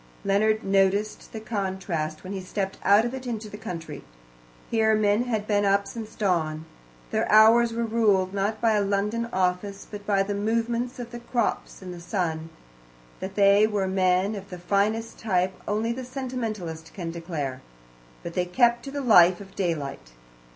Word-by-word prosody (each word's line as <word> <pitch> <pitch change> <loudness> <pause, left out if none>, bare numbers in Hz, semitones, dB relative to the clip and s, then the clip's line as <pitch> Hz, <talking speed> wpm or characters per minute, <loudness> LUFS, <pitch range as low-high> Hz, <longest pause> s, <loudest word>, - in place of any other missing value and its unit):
Leonard 215 +2 +2
noticed 195 +2 +1
the 220 - -6
contrast 190 -7 -3
when 190 +1 -6
he 190 - -4
stepped 195 +1 -4
out 205 +3 +5
of 240 - -3
it 260 -1 -6
into 220 -2 -4
the 205 - -9
country. 165 -9 -7 0.7
Here 220 -1 +3
men 215 +2 +2
had 220 -4 -1
been 205 -1 +1
up 200 0 +3
since 220 -1 -8
dawn. 160 -6 0 0.5
Their - - 0
hours 225 +2 +7
were 230 0 -1
ruled, 205 -5 +2
not 205 +2 -1
by 230 0 +3
a 210 -1 +2
London 210 +4 -1
office, 185 +2 -1
but 205 -1 -7
by 200 -2 +3
the 205 +1 -3
movements 230 +4 -1
of 240 -1 -7
the 240 - -7
crops 235 -4 -2
and 180 -1 -7
the 175 - -9
sun. 165 -3 -2 0.7
That 190 +1 -6
they 200 +1 +5
were 205 -3 -1
men 190 +1 +2
of 195 -1 -7
the 180 - -7
finest 210 +5 0
type 185 -3 +1
only 220 +3 0
the 260 +2 -6
sentimentalist 225 - -5
can 170 -4 -4
declare. 160 -6 -4 0.6
But 170 - -6
they 180 0 0
kept 240 +5 +3
to 275 - -6
the 285 0 -3
life 185 -8 +6
of 195 -1 -12
daylight. 145 - -3
200 Hz, 175 wpm, -26 LUFS, 185-225 Hz, 0.7 s, hours